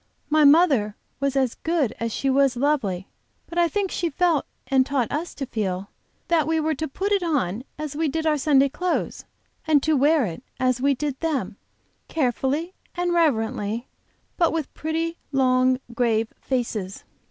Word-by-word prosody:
My 310 Hz, 0 st, +5 dB
mother 280 Hz, -, +5 dB, 0.2 s
was 275 Hz, 0 st, 0 dB
as 260 Hz, -3 st, +2 dB
good 320 Hz, -8 st, 0 dB
as 230 Hz, 0 st, -2 dB
she 275 Hz, -, -2 dB
was 270 Hz, -1 st, +3 dB
lovely, 230 Hz, -10 st, 0 dB, 0.4 s
but 345 Hz, -, -3 dB
I 345 Hz, -, +5 dB
think 385 Hz, +3 st, -1 dB
she 345 Hz, -, -1 dB
felt 330 Hz, -1 st, +1 dB, 0.2 s
and 265 Hz, -1 st, +3 dB
taught 260 Hz, -3 st, -1 dB
us 320 Hz, +4 st, -3 dB
to 275 Hz, -, -4 dB
feel, 200 Hz, -5 st, -3 dB, 0.4 s
that 325 Hz, -3 st, +2 dB
we 320 Hz, 0 st, +1 dB
were 315 Hz, 0 st, +1 dB
to 315 Hz, +2 st, -3 dB
put 390 Hz, +9 st, -3 dB
it 400 Hz, -2 st, +3 dB
on 255 Hz, -, -1 dB
as 300 Hz, -1 st, -5 dB
we 320 Hz, +1 st, 0 dB
did 320 Hz, +3 st, -2 dB
our 305 Hz, -2 st, +2 dB
Sunday 280 Hz, -1 st, +4 dB
clothes, 360 Hz, +6 st, -2 dB, 0.4 s
and 295 Hz, -3 st, +4 dB
to 315 Hz, 0 st, +2 dB
wear 290 Hz, 0 st, +4 dB
it, 170 Hz, +2 st, -6 dB, 0.2 s
as 255 Hz, -1 st, +1 dB
we 280 Hz, +1 st, +3 dB
did 285 Hz, 0 st, -3 dB
them, 285 Hz, -, -2 dB, 0.5 s
carefully 290 Hz, +4 st, -1 dB, 0.2 s
and 350 Hz, 0 st, 0 dB
reverently, 230 Hz, -7 st, 0 dB, 0.5 s
but 335 Hz, -3 st, +3 dB
with 320 Hz, -3 st, -3 dB
pretty 330 Hz, +2 st, -2 dB
long, 255 Hz, -1 st, +3 dB
grave 225 Hz, -2 st, +1 dB
faces. 225 Hz, -7 st, -3 dB
280 Hz, 170 wpm, -24 LUFS, 250-320 Hz, 0.5 s, My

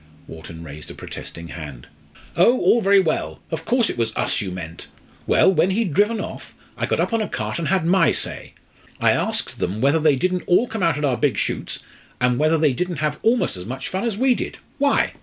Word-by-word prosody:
Wharton 80 Hz, 0 st, -10 dB
raised 75 Hz, -1 st, -9 dB
a -, -, -9 dB
protesting 85 Hz, 0 st, -8 dB
hand. 75 Hz, -7 st, -8 dB, 0.5 s
"Oh 235 Hz, +9 st, +5 dB
all 235 Hz, -, +4 dB
very 200 Hz, 0 st, +5 dB
well! 165 Hz, -5 st, -1 dB
Of 160 Hz, 0 st, -4 dB
course 240 Hz, -1 st, +2 dB
it -, -, -3 dB
was 115 Hz, -1 st, 0 dB
us -, -, 0 dB
you 100 Hz, -, -3 dB
meant! 85 Hz, -3 st, -7 dB, 0.4 s
Well, 190 Hz, -, +5 dB
when 175 Hz, +2 st, +3 dB
he'd 195 Hz, -4 st, 0 dB
driven 210 Hz, +5 st, +2 dB
off, -, -, -7 dB, 0.2 s
I -, -, -2 dB
got -, -, 0 dB
up -, -, 0 dB
on 225 Hz, -, +2 dB
a 215 Hz, -, -1 dB
cart -, -, -3 dB
and 165 Hz, -, -2 dB
had 185 Hz, 0 st, +1 dB
my 190 Hz, +3 st, +4 dB
say. -, -, -2 dB, 0.4 s
I -, -, +4 dB
asked -, -, -1 dB
them 95 Hz, +4 st, -2 dB
whether 140 Hz, +6 st, +3 dB
they 155 Hz, -2 st, +4 dB
didn't 180 Hz, +6 st, 0 dB
all 180 Hz, +7 st, +4 dB
come 225 Hz, -4 st, -5 dB
out 165 Hz, -4 st, +2 dB
at 150 Hz, -, 0 dB
our 130 Hz, -4 st, +1 dB
big -, -, +1 dB
shoots, -, -, -3 dB, 0.4 s
and 125 Hz, 0 st, +2 dB
whether 155 Hz, +2 st, +3 dB
they 150 Hz, -3 st, +3 dB
didn't 180 Hz, +6 st, -2 dB
have 150 Hz, 0 st, -1 dB
almost 235 Hz, -, +2 dB
as 90 Hz, -, -7 dB
much 130 Hz, +2 st, -5 dB
fun 190 Hz, +1 st, -2 dB
as 230 Hz, -4 st, -1 dB
we 260 Hz, +2 st, +4 dB
did -, -, -5 dB, 0.2 s
why! 285 Hz, 0 st, +2 dB
160 Hz, 225 wpm, -22 LUFS, 120-200 Hz, 0.5 s, Oh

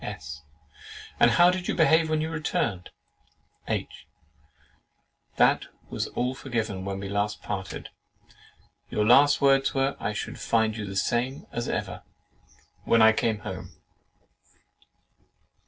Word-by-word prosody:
'" -, -, -14 dB
S. 75 Hz, 0 st, -9 dB, 0.8 s
"And -, -, +6 dB
how 175 Hz, +1 st, +5 dB
did 180 Hz, -1 st, -4 dB
you -, -, -1 dB
behave 160 Hz, -1 st, +4 dB
when 155 Hz, -1 st, +1 dB
you 160 Hz, +1 st, -3 dB
returned?" 120 Hz, -, -2 dB, 0.8 s
H. -, -, -4 dB, 1.3 s
"That -, -, +3 dB, 0.2 s
was -, -, -2 dB
all 125 Hz, +1 st, 0 dB
forgiven 110 Hz, -8 st, -3 dB
when 100 Hz, 0 st, -4 dB
we 100 Hz, -, -5 dB
last 100 Hz, +1 st, -2 dB
parted, 95 Hz, -2 st, -5 dB, 0.3 s
and -, -, -26 dB, 0.6 s
your 105 Hz, -, 0 dB
last 140 Hz, +5 st, +5 dB
words 135 Hz, -1 st, +3 dB
were, 135 Hz, +1 st, +1 dB
'I 105 Hz, -, -2 dB
should 100 Hz, -, -5 dB
find 110 Hz, -1 st, +1 dB
you 105 Hz, -2 st, -5 dB
the 95 Hz, -, -6 dB
same 125 Hz, +6 st, -1 dB
as 120 Hz, 0 st, -3 dB
ever' -, -, -3 dB, 0.8 s
when 115 Hz, -1 st, +4 dB
I 110 Hz, -, +8 dB
came 110 Hz, -1 st, -1 dB
home? 95 Hz, -3 st, -7 dB
115 Hz, 140 wpm, -26 LUFS, 100-140 Hz, 1.3 s, I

